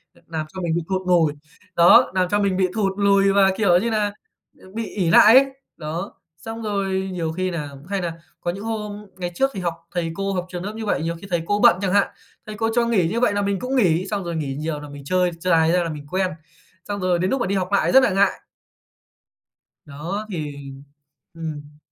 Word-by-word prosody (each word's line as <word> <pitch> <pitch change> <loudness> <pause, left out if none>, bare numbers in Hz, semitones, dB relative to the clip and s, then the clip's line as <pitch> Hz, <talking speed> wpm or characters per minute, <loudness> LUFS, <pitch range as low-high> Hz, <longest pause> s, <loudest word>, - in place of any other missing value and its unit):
Ờ, - - -22
làm 160 -2 -4
cho 185 - -6
mình 170 -2 -1
bị 170 - 0
thụt 185 -1 -2
nùi. 165 -4 +3 0.4
Đó, 170 0 +6
làm 185 -1 +1
cho 205 +1 +1
mình 195 -2 +1
bị 185 - +3
thụt 195 -3 +1
lùi 200 -1 +4
và, 195 -1 +5
kiểu 190 -5 +4
như 230 +5 -1
nà, 210 -2 0 0.6
bị 225 +1 -3
ỷ 185 -6 -1
lại 215 +7 +8
ấy. 275 - +7 0.3
Đó. 165 +4 -5 0.2
Xong 225 +7 -7
rồi 195 -3 -1
nhiều 165 -3 -2
khi 185 +2 -2
nà 150 -4 -4 0.2
hay 200 -2 -1
nà 170 -2 -3 0.3
có 175 - -1
những 195 +3 -8
hôm 210 -2 -5
ngày 175 -1 -4
trước 270 +7 +1
thì 195 - -5
học 175 -2 -1 0.2
thầy 170 -2 -2
cô, 195 0 -2
học 180 -1 -2
trường 180 -1 -6
lớp 205 +2 -5
như 225 0 -5
vậy, 205 - 0
nhiều 170 +1 -2
khi 200 - -9
thầy 175 -1 +1
cô 205 +3 0
bận 175 - +6
chẳng 190 -2 0
hạn. 200 0 +4 0.4
Thầy 215 - -6
cô 225 +2 0
cho 240 -1 +3
nghỉ 210 -8 +2
như 225 +7 -1
vậy 245 -4 +2
là 205 - 0
mình 200 -1 -1
cũng 255 +5 -3
nghỉ. 185 -6 +2
Xong 200 -1 -2
rồi 170 -1 -4
nghỉ 140 -4 -3
nhiều 150 0 -4
nà 150 - -9
mình 145 0 -10
chơi, 180 +3 +1
chơi 185 +2 -1
dài 160 0 +4
ra 180 0 +2
là 165 - -3
mình 150 -2 -7
quen, 185 0 0 0.6
xong 205 -1 -3
rồi 180 -2 +1
đến 185 +2 0
núc 270 - 0
mà - - 0
đi 200 - 0
học 185 0 -2
lại 200 - +3
rất 265 0 +7
là - - +4
ngại. 195 +1 +3 1.6
Đó 165 +9 -5
thì 145 -5 -6 0.6
ừm. 150 -3 -7
185 Hz, 240 wpm, -22 LUFS, 170-205 Hz, 1.6 s, lại